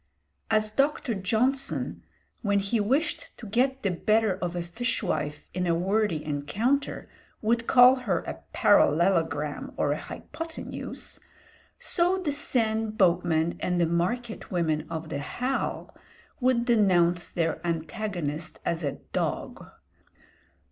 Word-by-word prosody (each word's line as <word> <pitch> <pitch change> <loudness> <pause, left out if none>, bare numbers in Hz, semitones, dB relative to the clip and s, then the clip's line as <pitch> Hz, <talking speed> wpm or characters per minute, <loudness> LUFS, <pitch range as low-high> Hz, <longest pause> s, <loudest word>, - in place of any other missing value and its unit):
As 215 -1 +2
Dr. 275 0 +1
Johnson, 230 +8 0 0.4
when 205 -3 +2
he 200 +3 0
wished 265 +10 -1
to 235 - -10
get 260 +6 +1
the 195 - +1
better 215 +4 +2
of 180 -2 -3
a 175 - -2
fishwife 170 -6 -2
in 180 0 -1
a 170 - +3
wordy 190 -2 0
encounter, 195 - -1 0.3
would 230 +1 0
call 255 +1 +7
her 200 -9 -1
a 70 0 -7
parallelogram 160 - +2
or - - +1
a - - -1
hypothenuse, 325 -1 -7 0.6
so 355 +2 +2
the 360 -6 -1
Seine 225 -6 0
boatmen 175 -5 +2
and 180 -1 0
the 170 - +4
market 185 +8 -2
women 160 -4 0
of 160 -1 -5
the 140 - -3
Halles 250 - -2 0.5
would 250 -2 +2
denounce 180 -7 +3
their 165 -2 -1
antagonist 170 -2 -3
as 165 0 -1
a 140 -2 -1 0.2
"dogue." - - -2
195 Hz, 125 wpm, -27 LUFS, 170-240 Hz, 0.6 s, call